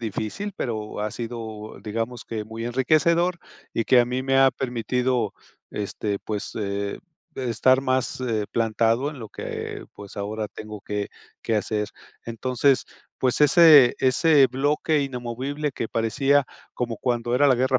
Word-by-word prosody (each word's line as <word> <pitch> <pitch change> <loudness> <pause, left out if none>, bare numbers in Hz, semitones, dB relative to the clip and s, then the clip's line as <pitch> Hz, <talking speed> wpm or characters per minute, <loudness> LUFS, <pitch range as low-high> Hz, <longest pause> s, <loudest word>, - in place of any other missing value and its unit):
difícil, 115 - -4
pero 110 -4 -4
ha 105 0 -1
sido, 110 -2 -7
digamos 115 +3 -4
que 110 -2 -4
muy 110 +1 -6
enriquecedor 155 +8 +2 0.4
y 115 - 0
que 125 - +6
a 120 - +3
mí 125 +2 -2
me 135 0 +2
ha 135 0 +6
permitido, 125 -2 -1 0.4
este, 100 0 -3
pues, 105 0 -5
eh, 100 -1 -3 0.4
estar 130 +1 +3
más, 130 -1 -1
eh, 110 -4 -1
plantado 115 +4 +1
en 150 - -10
lo 110 -3 -8
que, - - -6
pues, 100 -1 -11
ahora 105 +1 -3
tengo 105 -1 -9
que 105 0 -3 0.3
que 110 - 0
hacer. 105 0 -1 0.4
Entonces, 130 +3 +1 0.3
pues 130 +2 +1
ese 150 -4 +8
ese 140 +2 +5
bloque 145 +4 +1
inamovible 135 +3 -3
que 115 - -4
parecía 135 +5 +2 0.3
como 120 -2 -3
cuando 120 -1 -1
era 145 +3 +4
la 130 - +5
Guerra 130 +1 +2
120 Hz, 150 wpm, -24 LUFS, 110-135 Hz, 0.4 s, ese